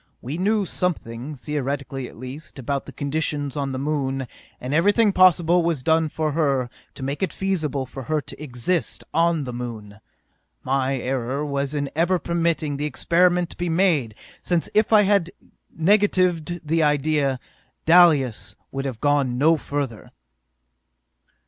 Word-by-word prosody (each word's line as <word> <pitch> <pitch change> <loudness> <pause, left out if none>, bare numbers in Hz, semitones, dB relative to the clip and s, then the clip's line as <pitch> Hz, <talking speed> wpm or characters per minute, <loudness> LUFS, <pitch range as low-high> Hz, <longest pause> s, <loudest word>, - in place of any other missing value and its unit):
We 135 +5 -5
knew 205 +2 +2
something, 150 -7 -3
theoretically 140 -1 -4
at - - -14
least, 130 +7 -9
about 135 +1 -3
the - - -7
conditions 145 -1 -2
on 140 -2 -2
the 130 - -3
Moon, 135 -2 -1 0.3
and 125 +3 -4
everything 205 +6 +4
possible 180 -2 +5
was 165 -6 -1
done 160 +1 +2
for 155 0 -1
her, 140 -5 0 0.2
to 135 - -8
make 140 +5 -3
it 190 - 0
feasible 155 -9 -2
for 130 +1 -8
her 155 -1 +2
to 145 - -10
exist 145 +6 -2
on 165 -1 +2
the 125 -2 -6
Moon. 110 -4 -7 0.6
My 135 0 0
error 130 +2 -2
was 140 0 -2
in 145 -1 -1
ever 175 +3 +2
permitting 165 -4 -1
the 145 - -2
experiment 175 +4 +2
to - - -12
be 175 0 -2
made, 160 - +2 0.3
since 175 -2 -1
if 215 +1 +2
I 215 -1 +7
had 200 -3 +2 0.4
negatived 175 -3 +1
the 165 +2 +2
idea. 145 -2 +1 0.5
Dalis 140 - +4 0.2
would 135 0 -4
have 125 -5 -5
gone 140 -4 +2
no 160 +5 +4
further! 140 -7 -4
150 Hz, 150 wpm, -23 LUFS, 135-170 Hz, 0.6 s, I